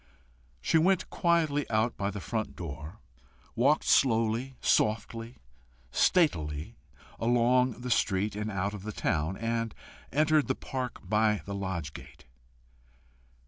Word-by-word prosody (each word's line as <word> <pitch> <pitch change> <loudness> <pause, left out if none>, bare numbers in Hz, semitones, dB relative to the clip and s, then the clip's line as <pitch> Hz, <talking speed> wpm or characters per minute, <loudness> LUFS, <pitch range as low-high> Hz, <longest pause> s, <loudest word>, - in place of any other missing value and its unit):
She 165 - +3
went 185 +3 +2
quietly 160 -4 +1
out 110 +2 +1
by 100 0 -1
the 105 0 -5
front 110 +2 -3
door, 80 0 -7 0.6
walked 135 +6 +3
slowly, 115 +1 +2
softly, 115 +3 0 0.5
statelily 75 - +1 0.5
along 120 +1 +2
the 125 0 -4
street 105 -2 +1
and 105 +1 -3
out 100 0 -2
of 105 - -7
the 110 +2 -5
town, 80 +3 -1
and 115 0 -2 0.4
entered 155 +1 +3
the 130 - 0
park 130 -2 -5
by 105 -1 +2
the 100 - -5
lodge 95 -6 -4
gate. - - -12
115 Hz, 125 wpm, -29 LUFS, 100-130 Hz, 0.6 s, She